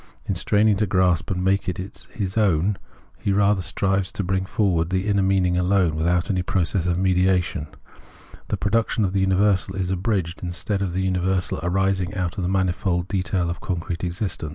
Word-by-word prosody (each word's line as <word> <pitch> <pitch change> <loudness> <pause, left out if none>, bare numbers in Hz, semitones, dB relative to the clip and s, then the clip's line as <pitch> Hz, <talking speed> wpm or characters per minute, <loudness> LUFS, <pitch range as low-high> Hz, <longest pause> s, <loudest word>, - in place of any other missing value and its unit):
In - - -1
straining 105 +3 +2
to 105 +1 +1
grasp 90 -2 +2
it 95 - 0
and 90 0 -2
make 95 0 +1
it 90 +3 -6
his 95 -4 -4
own, 100 -2 +2 0.4
he 100 - -1
rather 100 0 +3
strives 95 +1 0
to 100 - -2
bring 95 +1 -1
forward 95 -6 +1
the 95 +1 0
inner 100 -1 +2
meaning 95 -2 +2
alone, 90 -3 +2
without 85 +2 +1
any 95 -2 0
process 90 -1 0
of 90 -1 +1
mediation; 90 -4 +1 0.8
the - - -1
production 110 0 +1
of 95 - -2
the 100 - +1
universal 95 0 +2
is 95 -1 -2
abridged, 95 -3 -1
instead 90 +3 -3
of 95 -3 -2
the 95 +1 -1
universal 90 -2 0
arising 95 +2 0
out 90 -2 -2
of - - -1
the 90 - 0
manifold 90 -1 0
detail 90 -2 0
of 85 0 -4
concrete 85 -1 -4
existence. 90 -3 -3
95 Hz, 185 wpm, -23 LUFS, 90-100 Hz, 0.8 s, rather